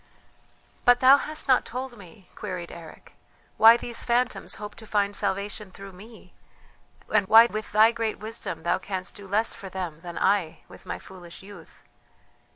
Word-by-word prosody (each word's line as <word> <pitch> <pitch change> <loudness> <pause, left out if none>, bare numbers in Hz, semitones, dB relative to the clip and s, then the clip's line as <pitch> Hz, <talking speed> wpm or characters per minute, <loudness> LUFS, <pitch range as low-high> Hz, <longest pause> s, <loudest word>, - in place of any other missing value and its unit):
"But 245 0 +5
thou 265 +2 +7
hast 305 +1 -5
not 260 -2 +4
told 250 +2 -6
me," 195 -1 -16
queried 180 -4 -6
Eric, 165 -2 -13 0.4
"why 225 +1 +8
these 240 -1 -5
phantoms 245 +1 -1
hope 210 0 -8
to 220 - -12
find 205 -1 0
salvation 200 +1 -2
through 195 +1 -11
me, 205 -1 -15 0.8
and 205 -3 +3
why 225 +3 +8
with 215 -2 -5
thy 215 +2 +5
great 225 -2 -3
wisdom 220 -5 -6
thou 170 - +1
canst 190 -1 -5
do 200 -1 -11
less 215 +4 0
for 195 - -10
them 180 -4 -6
than 175 -1 -8
I 195 -5 0
with - - -16
my - - -4
foolish 180 -2 -13
youth?" 195 -5 -14
205 Hz, 165 wpm, -25 LUFS, 185-230 Hz, 0.8 s, why